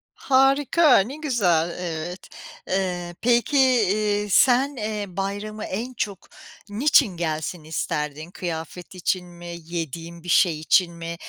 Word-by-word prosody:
Harika, 275 +1 +4
ne 240 +9 -2
güzel. 180 - +1
Evet. 175 +1 -5 0.4
Eee, 180 -2 -2
peki, 240 +4 +2
eee, 210 -4 +2
sen, 265 +6 +4
eee, 210 -2 -3
bayramı 205 +2 -4
en 235 +7 -4
çok 200 -5 -4 0.4
niçin 220 - +3
gelsin 160 0 -3
isterdin? 150 +1 -4
Kıyafet 175 0 -6
için 180 0 -1
mi, 175 0 -9
yediğin 170 0 -6
bir 175 - -8
şey 165 -3 +3
için 170 +2 +3
mi 170 0 -6
185 Hz, 120 wpm, -23 LUFS, 170-230 Hz, 0.4 s, Harika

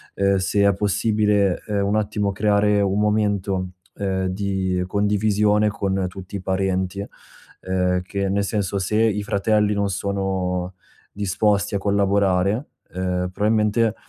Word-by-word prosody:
ehm, 100 0 +2
se 100 +2 +1
è 100 - +4
possibile, 105 -1 +1
ehm, 100 -1 0
un 100 +2 0
attimo 105 -1 -1
creare 105 0 +2
un 100 +1 +1
momento, 100 -3 0 0.3
ehm, 95 -1 -1
di 95 -1 -1
condivisione 105 +1 +2
con 95 -2 -1
tutti 95 +1 -8
i - - -8
parenti. 95 +1 -1 0.6
Ehm, 90 -1 0
che 100 +1 -2
nel 100 +1 +1
senso: 100 -1 -2
se 95 +3 -1
i 105 -2 +1
fratelli 105 +1 +1
non 100 0 0
sono 95 -2 -2 0.4
disposti 100 +1 0
a - - +3
collaborare, 100 +3 +1 0.3
ehm, 90 0 -1
probabilmente, 105 +1 +1
100 Hz, 130 wpm, -22 LUFS, 95-105 Hz, 0.6 s, è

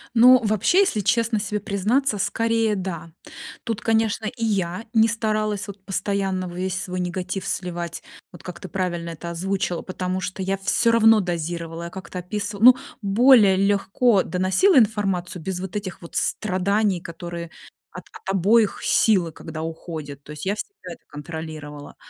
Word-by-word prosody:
Ну, 250 +2 +8
вообще, 215 - +3
если 375 - +2
честно 230 +1 +1
себе 210 +1 -2
признаться, 210 +4 0
скорее, 225 +1 +1
да. 170 -4 -5 0.5
Тут, 225 -2 -3
конечно, 225 -1 +1
и 230 +1 -3
я 195 -1 -1
не 225 -1 +5
старалась 215 -2 -1
вот 200 -1 -9
постоянно 195 -2 -2
весь 185 +1 -3
свой 180 0 -4
негатив 180 +2 -3
сливать, 175 -2 -4 0.3
вот 175 - -14
как 180 - -8
ты 185 - -8
правильно 175 -2 -3
это 170 +1 -7
озвучила, 180 0 -2
потому 185 0 -3
что 185 +1 -4
я 195 +1 -1
всё 230 +4 +2
равно 225 -1 +6
дозировала, 170 -1 -4
я 170 - -6
как-то 185 0 -8
описы 205 +3 -4
ну 250 +3 +8 0.2
более 210 -1 +5
легко 200 +2 +2
доносила 190 - +3
информацию 195 -5 +1
без 180 +1 -3
вот 190 +1 -6
этих 190 -3 -5
вот 170 - -11
страданий, 200 -1 0
которые 170 0 -7 0.4
от 180 - -10 0.3
обоих 205 +3 +3
силы, 185 -7 +3
когда 155 +1 -7
уходят. 160 -3 -7
То 150 - -10
есть 150 +3 -7
я 200 - +1
всегда 210 - -8
это - - -14
контролировала. 150 -1 -8
190 Hz, 155 wpm, -23 LUFS, 175-215 Hz, 0.5 s, Ну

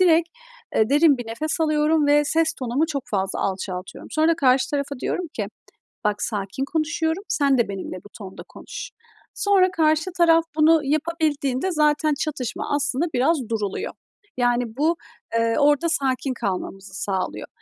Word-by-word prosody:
direkt, 335 -2 +4 0.5
eee, 220 +2 +3
derin 290 -2 +5
bir 245 - -6
nefes 305 +9 -3
alıyorum 305 -1 +2
ve 295 +1 +4
ses 320 +2 +2
tonumu 260 +5 -1
çok 285 -4 -3
fazla 195 -2 -1
alçaltıyorum. 185 -1 -4
Sonra 320 +2 +3
karşı 260 -3 +3
tarafa 280 -2 -2
diyorum 360 - -2
ki: - - -2 0.6
"Bak, 210 -1 0
sakin 205 +4 -3
konuşuyorum, 320 +4 -1
sen 280 -3 +2
de 235 - +2
benimle 190 -1 -5
bu - - -12
tonda 195 -3 -9
konuş." - - -8 0.4
Sonra 380 -3 +3
karşı 315 +2 +2
taraf 330 -1 +5
bunu 315 0 +5
yapabildiğinde 305 0 0
zaten 300 -1 +2
çatışma 280 -3 -2
aslında 290 +2 0
biraz 275 +6 +3
duruluyor. 210 -4 -2 0.4
Yani 245 0 +2
bu, 320 +4 +2 0.4
eee, 230 0 +2
orada 295 +3 +4
sakin 270 -4 0
kalmamızı 195 -3 -4
sağlıyor. 190 -2 -3
290 Hz, 145 wpm, -23 LUFS, 240-320 Hz, 0.6 s, derin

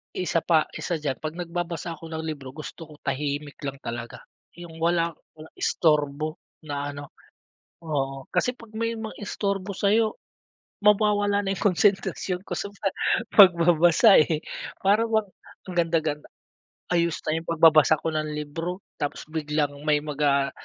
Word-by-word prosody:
Isa 175 -2 0
pa 160 -2 +3 0.2
isa 175 - -2
diyan 145 -4 -3
'pag 155 +1 -5
nagbabasa 175 -1 -4
ako 165 - -11
ng 160 0 -4
libro 140 -4 -6
gusto 160 +1 -8
ko 155 - -14
tahimik 145 +1 -3
lang 140 0 -3
talaga, 120 0 -6 0.3
'yung 170 -2 -10
wala 170 0 +2 0.2
walang 155 +1 -14
istorbo 155 0 +1 0.2
na 145 -1 -4
ano. 145 -1 -9 0.7
Oo 135 -3 -2
kasi 250 0 +1
'pag 225 -2 -15
may 230 +1 -2
mang-istorbo 200 -2 -3
sa'yo 215 +2 +2 0.7
mawawala 205 -1 +3
na 195 - 0
'yung - - -7
konsentrasyon 190 -1 +1
ko - - -9
sa 200 - -3 0.7
pagbabasa, 175 +2 +7
eh, 155 0 +2 0.4
parang 210 +4 +3
bang 220 -2 +2 0.4
ang 185 - -6
ganda 165 -1 +3
ganda, 150 -1 -4 0.6
ayos 170 -2 +1
na 155 +1 +1
'yung 165 - -10
pagbabasa 160 -2 +5
ko - - -1
ng 155 0 -2
libro 165 +5 -4 0.2
tapos 145 - -3
biglang 150 -2 -1
may 150 -1 +3
mag 150 -1 -6
ah 140 -1 +3
165 Hz, 150 wpm, -25 LUFS, 150-185 Hz, 0.7 s, pagbabasa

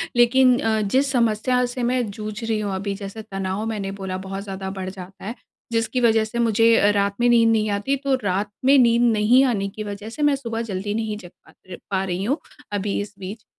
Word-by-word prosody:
लेकिन 250 +1 +5
अ, 220 -1 +1
जिस 265 +7 +1
समस्या 245 +1 +2
से 245 0 -4
मैं 245 0 +1
जूझ 215 +1 -6
रही 225 -1 0
हूँ 205 -2 -2
अभी, 200 +1 -3
जैसे 200 +2 -7
तनाव 195 0 -4
मैंने 205 -3 -3
बोला, 185 -1 -3
बहुत 195 +1 -6
ज़्यादा 190 -1 -5
बढ़ 185 - -3
जाता 190 0 -10
है। 225 +4 -4 0.4
जिसकी 230 +2 0
वजह 225 -2 +4
से 235 +2 -5
मुझे 230 0 +4
अ, 205 - +4
रात 200 0 +1
में 240 - +3
नींद 230 -1 +5
नहीं 215 -1 +1
आती, 205 +7 0
तो 275 -1 0
रात 200 +2 -1
में 275 +1 +6
नींद 235 -1 +4
नहीं 225 +5 +4
आने 205 -6 0
की 215 - -4
वजह 205 +1 -6
से 270 +7 -7
मैं 290 -1 +4
सुबह 230 -4 -4
जल्दी 195 +2 -3
नहीं 220 -1 -2
जग 180 -3 -12 0.2
पा - - -18 0.2
र 180 - -6
पा 190 -1 +1
रही 185 0 -2
हूँ, 275 +8 0 0.3
अभी 205 0 -1
इस 205 0 -7
बीच। 200 +4 -8
215 Hz, 225 wpm, -22 LUFS, 200-235 Hz, 0.4 s, में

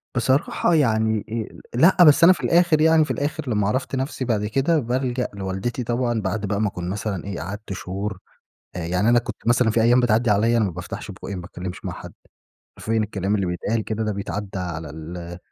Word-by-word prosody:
بصراحة 130 +7 +1
يعني 110 -6 +2 0.5
آآ - - -2
لأ، 175 +6 +6
بس 150 0 +6
أنا 185 - +9
في - - -9
الآخر 170 -2 +4
يعني 160 0 +5
في - - -4
الآخر 150 -1 -3
لما 105 -3 +1
عرفت 130 +5 -1
نفسي 130 0 -3
بعد 110 -4 0
كده 135 +9 +1
بالجأ 125 0 -1
لوالدتي 100 +5 -3
طبعًا، 120 -1 -1
بعد 100 +2 -2
بقى 100 +1 -1
ما 105 - +2
أكون 90 -2 -5
مثلًا 100 -2 -3
إيه 100 -3 -5
قعدت 100 0 -6
شهور. 95 +2 -5 0.6
آآ - - -3
يعني 90 +6 +1
أنا 120 0 +5
كنت 120 - -6
مثلًا 120 0 +4
في 115 - +2
أيام 120 +2 +5
بتعديِّ 120 0 +2
عليَّ 115 +4 +3
أنا 110 - +3
ما 95 - -2
بافتحش 90 +1 -7
بُقي 100 - -7
ما 90 - -5
باتكلمش 90 0 -7
مع - - -3
حد. - - -10 0.6
حرفيًا 115 +1 -1
الكلام 105 -2 -1
اللي 100 -2 0
بيتقال 100 +6 -2
كده 110 +1 -3
ده 110 - -1
بيتعد 100 0 -4
على 85 -4 -4
ال 80 +4 -8
على 85 0 -7
110 Hz, 210 wpm, -23 LUFS, 95-125 Hz, 0.6 s, أنا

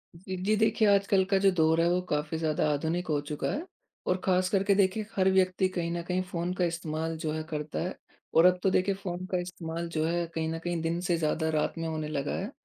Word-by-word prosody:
फिर 185 +1 -6
जी 215 +3 +3
देखिए, 220 0 +3
आजकल 200 -1 +4
का 195 - +5
जो 195 0 +5
दौर 160 -1 +3
है 170 - +3
वो 180 +1 +2
काफ़ी 150 +2 -1
ज़्यादा 155 -1 +1
आधुनिक 165 +5 -1
हो 150 -2 +1
चुका 150 0 -3
है। 315 +5 -3 0.4
और 185 - +2
ख़ास 185 -1 +2
करके 195 0 +2
देखिए 200 +2 +2
हर 190 -1 +4
व्यक्ति 185 0 +3
कहीं 175 -2 -2
न 170 0 -2
कहीं 180 +1 -1
फ़ोन, 180 -1 -3
का 180 -1 +1
इस्तेमाल 165 -1 -3
जो 155 -1 -2
है 155 0 -3
करता 150 -1 -3
है। 180 +3 -3 0.4
और 165 - +6
अब 180 0 +5
तो 195 - +4
देखिए 190 +1 +2
फ़ोन 185 -2 -5
का 185 - +2
इस्तेमाल 170 -1 -5
जो 155 -1 -1
है, 170 +1 0
कहीं 160 -1 -3
न 165 - -4
कहीं 175 -1 -1
दिन 165 +1 -1
से 170 - +3
ज़्यादा, 160 0 0
रात 155 +1 0
में 165 0 -2
होने 155 -1 -3
लगा 145 -2 -2
है। 200 +6 -4
175 Hz, 240 wpm, -29 LUFS, 160-185 Hz, 0.4 s, और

